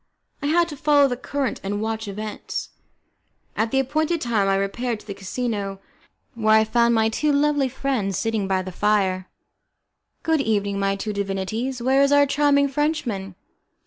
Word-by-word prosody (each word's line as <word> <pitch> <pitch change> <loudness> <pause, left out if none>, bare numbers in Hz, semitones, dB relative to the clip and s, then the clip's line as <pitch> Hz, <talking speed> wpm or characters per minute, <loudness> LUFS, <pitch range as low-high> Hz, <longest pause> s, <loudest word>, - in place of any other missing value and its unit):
I 285 - -1
had 340 +3 +3
to 295 - -6
follow 290 0 +4
the 250 - -2
current 265 0 -3
and 205 +1 -2
watch 220 0 -3
events. 210 +2 -5 0.9
At 220 - 0
the 270 - +1
appointed 310 +5 0
time 225 -7 +1
I 195 - +3
repaired 220 +4 -2
to - - -19
the 200 - -5
casino, 200 -1 -3 0.5
where 220 -2 +3
I - - +4
found 235 +1 +2
my 220 0 +3
two 295 +7 0
lovely 285 -1 +2
friends 245 -8 -1
sitting 220 -3 -1
by 190 -1 0
the 185 - -6
fire. 190 -1 +1 0.9
"Good 320 -3 +2
evening, 205 -4 0
my 195 0 +1
two 210 +2 -4
divinities, 205 +6 -3
where 265 +2 +4
is 280 0 +4
our 285 0 +6
charming 280 0 +3
Frenchman?" 270 - -2
225 Hz, 170 wpm, -23 LUFS, 200-280 Hz, 0.9 s, our